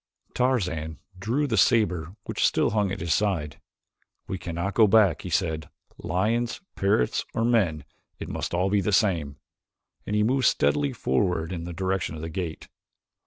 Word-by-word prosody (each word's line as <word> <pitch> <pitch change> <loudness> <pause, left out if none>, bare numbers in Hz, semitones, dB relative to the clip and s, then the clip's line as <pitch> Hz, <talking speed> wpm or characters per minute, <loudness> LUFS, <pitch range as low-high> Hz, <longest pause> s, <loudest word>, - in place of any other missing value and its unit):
Tarzan 90 -12 0 0.2
drew 120 +9 0
the 115 -6 -1
saber 95 - +2
which - - -2
still - - +3
hung 105 -3 +1
at 95 - -4
his 85 -1 +1
side. 80 -7 -1 0.7
"We 95 - -4
cannot 85 +4 -3
go 110 -2 +5
back," 100 -6 +4
he 90 - -6
said. 80 -2 -1 0.3
"Lions, 115 +7 0 0.2
parrots, 100 -11 +1
or 115 - +1
men, 90 - +1 0.3
it - - -7
must - - -3
be 85 - -2
all 95 +2 +1
the 105 0 +1
same," 85 - +1 0.7
and 105 - -1
he 105 - +3
moved 130 +3 +2
steadily 70 0 +2
forward 80 +5 0
in 85 -2 -5
the 90 - -5
direction 95 -2 -2
of 80 - -7
the 80 - -4
gate. 80 -1 -5
95 Hz, 165 wpm, -26 LUFS, 80-105 Hz, 0.7 s, go